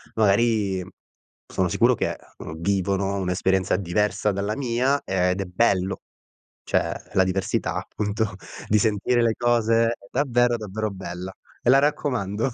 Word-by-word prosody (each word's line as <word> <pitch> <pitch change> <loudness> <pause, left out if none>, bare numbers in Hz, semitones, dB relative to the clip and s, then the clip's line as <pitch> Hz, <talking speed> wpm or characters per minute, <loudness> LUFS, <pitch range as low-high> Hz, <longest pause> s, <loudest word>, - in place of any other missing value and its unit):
magari 105 -3 +2 0.7
sono - - +1
sicuro - - +3
che, - - -1 0.2
uhm, 80 +1 -8
vivono 100 +1 0
un'esperienza 95 0 +1
diversa 105 +3 0
dalla 100 +2 -2
mia, 130 +2 +1
ed 90 0 0
è - - -3
bello. 95 0 +1 0.6
Cioè, - - +1 0.2
la 95 - +4
diversità 95 +1 -1
appunto, 105 -1 -2 0.3
di 105 - +3
sentire 110 +3 +2
le 115 -1 +3
cose 115 -1 +3
è 115 - -1 0.2
davvero, 120 -3 +2
davvero 110 0 -4
bella. 95 -1 -6 0.3
E 120 - +2
la 135 - +7
raccomando. 125 -6 0
105 Hz, 135 wpm, -24 LUFS, 95-115 Hz, 0.7 s, la